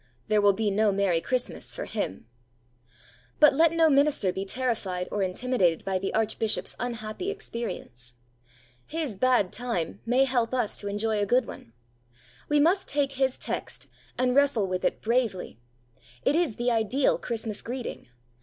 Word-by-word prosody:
There 215 -1 +4
will 205 -1 +5
be 210 +1 0
no 210 +1 +3
merry 195 -4 +1
Christmas 255 +4 -1
for - - -4
him! 95 - -4 1.1
But 300 -2 +7
let 320 +3 +4
no 330 -1 +4
minister 280 -10 +3
be 190 +1 -3
terrified 195 -6 -2
or 205 - -1
intimidated 185 -3 0
by 190 -1 0
the 195 - -2
Archbishop's 220 0 -1
unhappy 235 - -4
experience. 230 - -5 0.7
His 310 -9 -3
'bad 245 -3 +2
time' 235 -9 -3
may 250 +3 +4
help 250 -2 0
us 245 -5 -1
to 205 - -4
enjoy 210 +1 0
a 205 - 0
good 250 +3 +3
one. 115 - -11 0.8
We 295 0 +3
must 350 +6 +3
take 280 -1 0
his 265 -1 0
text, - - -5 0.3
and 250 0 +1
wrestle 280 -8 +3
with 185 0 -3
it - - -1
bravely. 225 - -1 0.7
It 285 - +3
is 330 -10 +1
the 245 +1 0
ideal 235 +4 +2
Christmas 225 -3 -3
greeting. 245 - -6
230 Hz, 155 wpm, -27 LUFS, 200-260 Hz, 1.1 s, But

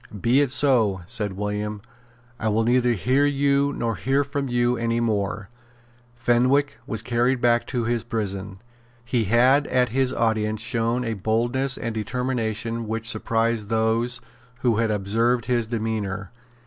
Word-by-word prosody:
"Be 120 +7 +3
it 145 - +1
so," 120 -9 +3
said 105 -1 -3
William. 105 +1 -3 0.6
"I 110 - 0
will 110 +2 +1
neither 125 +1 +3
hear 130 +7 +2
you 140 0 +2
nor 115 -5 -2
hear 135 +2 +1
from 140 0 -3
you 120 0 +1
any 115 0 -1
more." 105 -2 -1 0.7
Fenwick 125 +4 +2
was 110 -1 -1
carried 120 +2 +1
back 120 0 +2
to 120 -2 -2
his 115 0 -1
prison. 100 -4 -4 0.5
He 120 -2 0
had 125 +7 +4
at 125 -3 +1
this 130 -1 +2
audience 110 -3 0
shown 115 +2 -1
a 115 - -1
boldness 120 +6 0
and 115 - -4
determination 115 0 -2
which 115 +1 -2
surprised 115 -1 0
those 115 +2 0 0.4
who 120 -4 +2
had 115 -1 +1
observed 110 +4 +1
his 120 -2 0
demeanour. 105 -4 -3
115 Hz, 150 wpm, -24 LUFS, 110-125 Hz, 0.7 s, had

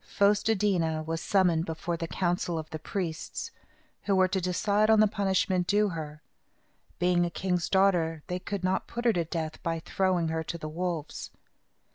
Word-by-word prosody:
Fos 205 +1 +2
te 225 +1 +2
dí 200 -2 +2
na 160 -1 -1
was 165 +1 -3
summoned 180 -5 +3
before 165 +1 -3
the 165 0 -4
council 175 0 -1
of 155 -1 -4
the 155 - -5
priests, 170 -1 -4 0.5
who 200 - +2
were 185 0 +5
to 190 0 -1
decide 205 +4 +1
on 220 -1 +6
the 215 - +7
punishment 190 -3 +1
due 210 0 +3
her. 155 -3 -6 0.7
Being 175 0 +3
a 175 - 0
king's 180 0 -1
daughter, 175 -5 +2
they 180 0 -3
could 190 +1 -4
not 185 +1 0
put 240 +1 -5
her 235 - +5
to 175 - +1
death 160 -1 -4
by 165 -1 -1
throwing 180 -1 0
her 160 0 -1
to 170 - -5
the 155 - -6
wolves. 165 -1 -4
180 Hz, 190 wpm, -28 LUFS, 165-195 Hz, 0.7 s, the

